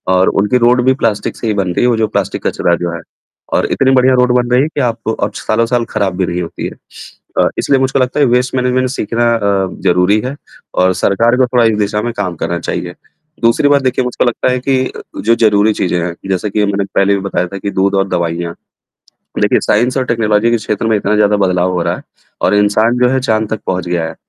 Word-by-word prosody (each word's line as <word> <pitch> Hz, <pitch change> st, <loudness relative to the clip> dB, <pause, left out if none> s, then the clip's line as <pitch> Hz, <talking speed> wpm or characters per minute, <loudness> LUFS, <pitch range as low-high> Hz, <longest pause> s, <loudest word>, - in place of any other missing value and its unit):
और 95 Hz, 0 st, +3 dB
उनकी 105 Hz, +5 st, +2 dB
रोड 125 Hz, +1 st, +3 dB
भी 130 Hz, -, +4 dB
प्लास्टिक 105 Hz, -1 st, 0 dB
से 115 Hz, -, -4 dB
ही 110 Hz, -, +1 dB
बन 95 Hz, -3 st, -1 dB
रही -, -, 0 dB
है। -, -, +4 dB
वो -, -, +2 dB
जो 110 Hz, -1 st, +1 dB
प्लास्टिक -, -, -3 dB
कचरा 85 Hz, -, +1 dB
जो 85 Hz, 0 st, -3 dB
है -, -, -6 dB, 0.5 s
और -, -, +2 dB
इतनी 135 Hz, 0 st, +2 dB
बढ़िया 130 Hz, 0 st, +4 dB
रोड 125 Hz, 0 st, +3 dB
बन 120 Hz, -1 st, +1 dB
रही 125 Hz, -, +4 dB
है 150 Hz, -, +1 dB
कि 150 Hz, -, -3 dB
आपको 115 Hz, -2 st, -1 dB
और 100 Hz, -1 st, -2 dB
सालों 115 Hz, +1 st, 0 dB
साल 120 Hz, 0 st, 0 dB
खराब 95 Hz, -3 st, -1 dB
भी 95 Hz, -, +1 dB
नहीं 90 Hz, 0 st, -3 dB
होती 85 Hz, -, -6 dB
है। -, -, -8 dB, 0.7 s
अ, -, -, +4 dB
इसलिए 135 Hz, -, +2 dB
मुझको 130 Hz, +1 st, +1 dB
लगता 130 Hz, +3 st, 0 dB
है 145 Hz, -, +5 dB
वेस्ट 125 Hz, +1 st, +1 dB
मैनेजमेंट 125 Hz, 0 st, +1 dB
सीखना 120 Hz, -2 st, -1 dB
अ, -, -, -2 dB, 0.4 s
ज़रूरी 90 Hz, +3 st, +3 dB
है 135 Hz, +3 st, -4 dB, 0.5 s
और 95 Hz, -, +3 dB
सरकार 105 Hz, +6 st, +2 dB
को 130 Hz, -, +4 dB
थोड़ा 120 Hz, -1 st, +2 dB
इस 110 Hz, -2 st, +2 dB
दिशा 105 Hz, +1 st, 0 dB
में 120 Hz, -, -2 dB
काम 95 Hz, -4 st, -2 dB
करना 85 Hz, +2 st, -3 dB
चाहिए। 90 Hz, +1 st, -4 dB, 0.5 s
दूसरी 115 Hz, +5 st, +3 dB
बात 140 Hz, -1 st, +4 dB
देखिए 130 Hz, 0 st, 0 dB
मुझको 125 Hz, 0 st, -1 dB
लगता 120 Hz, +1 st, 0 dB
है 125 Hz, -, 0 dB
कि 130 Hz, 0 st, 0 dB, 0.3 s
जो 115 Hz, -, +4 dB
ज़रूरी 110 Hz, -1 st, +3 dB
चीज़ें 90 Hz, -3 st, -1 dB
हैं, 85 Hz, -1 st, -4 dB
जैसे 95 Hz, +2 st, -1 dB
कि 105 Hz, +1 st, 0 dB
मैंने 100 Hz, 0 st, -1 dB
पहले 100 Hz, +1 st, +3 dB
भी 100 Hz, -, -3 dB
बताया 95 Hz, -2 st, -2 dB
था 100 Hz, -, -7 dB
कि 100 Hz, +1 st, -4 dB
दूध 100 Hz, +1 st, +1 dB
और 95 Hz, 0 st, +1 dB
दवाइयाँ, 85 Hz, -1 st, -2 dB, 0.9 s
देखिए -, -, +3 dB
साइंस 125 Hz, +5 st, +1 dB
एंड 130 Hz, -, -1 dB
टेक्नोलॉजी 115 Hz, -1 st, +1 dB
के 120 Hz, -, +2 dB
क्षेत्र 105 Hz, 0 st, -3 dB
में 110 Hz, -1 st, +2 dB
इतना 105 Hz, +1 st, 0 dB
ज़्यादा 105 Hz, 0 st, +3 dB
बदलाव 90 Hz, -2 st, +1 dB
हो 90 Hz, -, -1 dB
रहा -, -, -1 dB
है -, -, -10 dB, 0.4 s
और -, -, +2 dB
इंसान 110 Hz, +4 st, +2 dB
जो 125 Hz, 0 st, +3 dB
है 130 Hz, +1 st, +1 dB
चाँद 110 Hz, -4 st, 0 dB
तक 110 Hz, -, -2 dB
पहुँच 90 Hz, -1 st, -2 dB
गया 85 Hz, -2 st, -1 dB
है। 80 Hz, -, -10 dB
110 Hz, 240 wpm, -14 LUFS, 95-125 Hz, 0.9 s, है